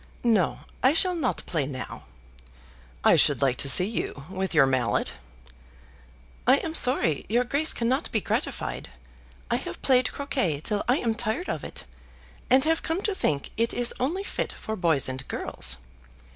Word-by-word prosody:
"No; 220 -8 +2 0.2
I 260 +3 +4
shall 365 +3 +3
not 310 -8 -2
play 150 -6 -1
now." 130 -3 -7 1.0
"I - - +6
should - - +4
like 130 -2 +2
to 140 - +3
see 180 +7 +7
you 195 -9 -4
with 190 0 -2
your 155 -5 +5
mallet." 130 -5 0 1.3
"I 260 - +8
am 320 +2 -4
sorry 215 - +2
your 240 +3 +2
Grace 285 +5 +1
cannot 255 +6 0
be 220 - +1
gratified. - - -3 0.6
I - - +3
have 115 - -7
played 255 -2 +3
croquet 260 - -1
till 205 +6 -1
I 250 +3 +3
am 230 -2 0
tired 235 +10 -3
of - - -3
it, - - -7 0.7
and 265 +1 +5
have 325 +1 +1
come 330 +4 -2
to 415 - 0
think 145 - -1
it 230 +1 0
is 245 -1 +2
only 335 +10 -1
fit - - -2
for 220 - -5
boys 165 -8 +1
and 130 0 -5
girls. 60 - -1
230 Hz, 170 wpm, -26 LUFS, -, 1.3 s, I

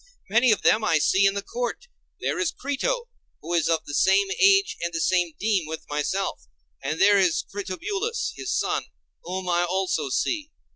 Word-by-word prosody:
Many 235 +3 +5
of 215 - +1
them 220 - +4
I 165 -7 +3
see 190 +6 +3
in 195 - 0
the 200 - -3
court. 245 - -4 0.4
There - - -1
is 340 -1 +1
Crito, 475 - -2 0.3
who 170 +3 -5
is 170 -2 +2
of 165 -1 0
the 145 - -7
same 195 +5 +3
age 395 0 +5
and 170 - -1
of - - -23
the 165 - -1
same 175 -2 +1
deme 200 -6 +1
with 160 0 -7
myself; 150 - -2 0.3
and 150 +4 -3
there 200 0 +6
is 180 -4 +2
Critobulus 390 - -3
his - - -5
son, - - 0 0.4
whom 185 +1 -4
I 175 0 +2
also 180 -5 -1
see. 305 - -1
195 Hz, 190 wpm, -25 LUFS, 170-245 Hz, 0.4 s, there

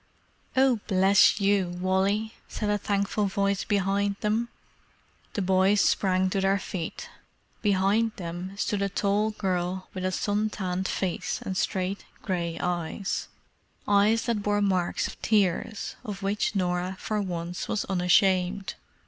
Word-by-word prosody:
"Oh, 260 -3 +4
bless 195 +2 +5
you, 195 -3 +1
Wally!" 195 +4 +1
said 210 -1 -2
a 205 - +1
thankful 200 +1 0
voice 200 0 0
behind 200 0 +1
them. 220 +3 0 0.8
The 200 - -1
boys 190 +2 +3
sprang 185 -1 +2
to 195 - 0
their 195 +1 +3
feet. 185 -4 -5 0.5
Behind 205 +2 +2
them 180 +2 -6
stood 205 -1 -1
a 200 - +1
tall 205 +2 +1
girl 185 -3 -2
with 185 - -5
a 185 - 0
sun 205 +3 0
tanned 185 -2 -2
face 185 -3 -2
and 190 - -3
straight 185 +1 -1 0.2
grey 170 -4 -2
eyes—eyes 200 +4 -1
that 230 -4 -1
bore 205 0 +1
marks 185 -4 +1
of - - -11
tears, 210 +1 0
of 205 -4 -6
which 205 +2 0
Norah 180 0 -1
for 215 -1 -1
once 175 -2 -4
was 215 - -1
unashamed. 185 +1 +2
195 Hz, 135 wpm, -27 LUFS, 185-205 Hz, 0.8 s, bless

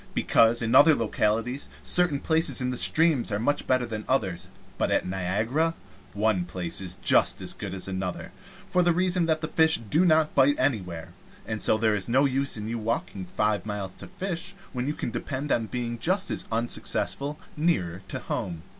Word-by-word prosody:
Because, 115 +1 +3
in 115 - -1
other 155 +1 +7
localities, 115 +3 -1
certain 175 -6 +3
places 160 -4 +2
in 125 -1 0
the - - -3
streams 155 -7 +3
are 100 - 0
much 135 +7 -1
better 130 -1 +2
than 110 -2 -5
others; 100 -10 0 0.3
but - - +1
at - - +1
Niagara 110 - -1 0.4
one 105 -3 +1
place 90 0 -4
is 90 -2 -1
just - - +4
as - - -2
good 100 - -7
as 95 0 -3
another, 95 -1 -4 0.4
for 180 -2 +2
the 175 -1 +3
reason 180 -1 +1
that 155 -1 +1
the 155 - -2
fish 160 0 +4
do 165 +4 +4
not 160 -3 +3
bite 140 +1 +4
anywhere, 95 - -2 0.3
and 110 0 -4
so - - +4
there 110 -1 +2
is 100 +1 -2
no 130 +4 +3
use 135 -2 0
in 105 0 -5
your 115 +1 -3
walking 105 -4 -3
five 105 +1 0
miles 105 -3 -5
to - - -11
fish, 185 0 -5 0.2
when 125 0 -3
you 150 - -2
can - - -4
depend 140 +4 -4
on 115 -1 +1
being 120 0 -4
just 185 - 0
as - - -2
unsuccessful 135 +5 -1 0.2
nearer 95 - 0 0.2
home. 85 -3 -4
120 Hz, 190 wpm, -26 LUFS, 105-155 Hz, 0.4 s, other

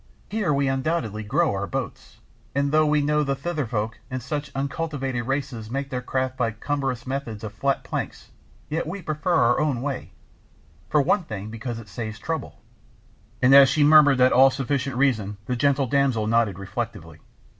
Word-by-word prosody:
Here 210 -6 0
we 140 -1 +1
undoubtedly 135 -5 -1
grow 140 +9 +1
our 100 0 -2
boats, - - -5 0.4
and 140 0 +1
though 155 0 +4
we 150 0 +3
know 150 +1 +2
the 140 -1 0
Thither 150 -1 -3
folk 110 0 -3
and 130 -1 -3
such 145 +3 -4
uncultivated 135 -3 -3
races 135 -5 -3
make 140 +3 -3
their 125 -1 -2
craft 130 +1 -2
by 115 -3 0
cumbrous 135 0 -3
methods 130 -5 -4
of 105 -1 -6
flat 135 +6 0
planks, - - -5 0.4
yet 155 +1 -2
we 185 +3 -5
prefer 155 +3 -1
our 120 -2 +4
own 145 -5 0
way, 140 -7 -4 0.8
for 150 -2 +3
one 200 +7 +2
thing 110 -3 -6
because 115 +1 -5
it 115 -2 -10
saves 110 +3 -6
trouble," 160 +4 -5 0.8
and 130 +2 +6
as 140 -1 +9
she 145 +2 +3
murmured 145 -2 +7
that 125 0 +5
all 135 +2 +7
sufficient 135 0 -2
reason 110 -7 +1
the 125 - -1
gentle 140 +1 +2
damsel 130 -4 +1
nodded 110 -4 +2
reflectively. 95 0 -6
135 Hz, 175 wpm, -24 LUFS, 115-145 Hz, 0.8 s, as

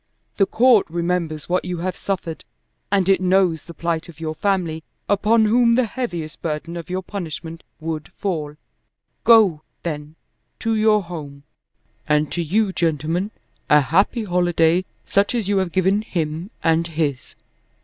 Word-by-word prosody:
The 195 - +4
Court 240 -3 +4
remembers 170 -2 -2
what 180 +1 +1
you 180 0 -3
have 180 +2 -3
suffered 180 -5 -4 0.5
and 195 -2 +2
it 190 -2 +4
knows 185 -3 +3
the 170 - -11
plight 170 +1 -2
of 165 - -13
your 160 -1 -3
family, 170 -3 -1 0.2
upon 215 +2 +3
whom 235 +2 +4
the 255 0 +3
heaviest 175 -10 -5
burden 165 +1 -3
of 170 +1 -7
your 185 +1 -2
punishment 165 -4 -6 0.2
would 155 -1 -4
fall. 155 -7 -3 0.7
Go, 210 -9 +6 0.2
then, 150 -2 -5 0.4
to 225 - -1
your 215 -1 +3
home. 145 -5 -8 0.6
And 150 0 +2
to 175 - -1
you, 195 +5 +1
gentlemen, 165 +4 0 0.4
a 150 - +7
happy 195 - +2
holiday 175 -2 +2 0.2
such 200 +5 +1
as 225 -5 -1
you 200 -1 +2
have 185 -2 -1
given 190 +3 +2
him 165 -3 -3
and 165 +1 +2
his! 150 -6 -2
175 Hz, 150 wpm, -21 LUFS, 160-200 Hz, 0.7 s, a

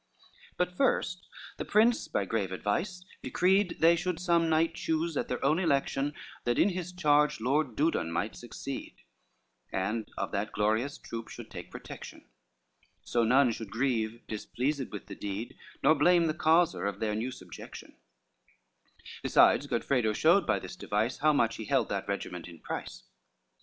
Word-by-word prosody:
II - - -30 0.3
But 180 0 +1
first 180 -7 0 0.3
the - - -3
prince, 225 +3 +3
by 100 - -1
grave 100 -2 -1
advice, 175 - -2 0.2
decreed 190 0 +2
They 165 +1 +7
should 175 0 -2
some 170 -2 +2
knight 160 +1 +2
choose 165 0 -1
at - - -1
their - - -2
own 155 +5 +3
election, 145 -3 0 0.3
That 120 0 0
in 200 - +5
his 180 -2 -4
charge 150 -6 +3
Lord 130 +1 0
Dudon 145 - +1
might 85 +6 -2
succeed, 125 +3 -7 0.8
And 105 +4 -2
of - - -2
that 100 +1 -2
glorious 110 +8 0
troop 115 -1 -7
should - - -10
take - - -8
protection; - - -10 0.8
So 120 - +1
none 125 +2 +4
should 110 -2 -6
grieve, 115 -1 -1
displeased 130 +5 -3
with 105 - -7
the - - -8
deed, 100 +3 -5 0.3
Nor 155 - +7
blame 170 +3 +4
the 155 - +1
causer 165 -4 +3
of 100 0 -4
their 110 -1 0
new 110 +4 -2
subjection: 90 -9 -10 1.3
Besides, - - +4
Godfredo 120 -6 +1
showed - - +4
by - - +3
this - - -7
device, 110 +4 -1
How 155 - +4
much 130 -6 +2
he 110 - -6
held - - +1
that - - -3
regiment 90 -2 -4
in 85 -1 -11
price. - - -6
140 Hz, 165 wpm, -30 LUFS, 110-165 Hz, 1.3 s, They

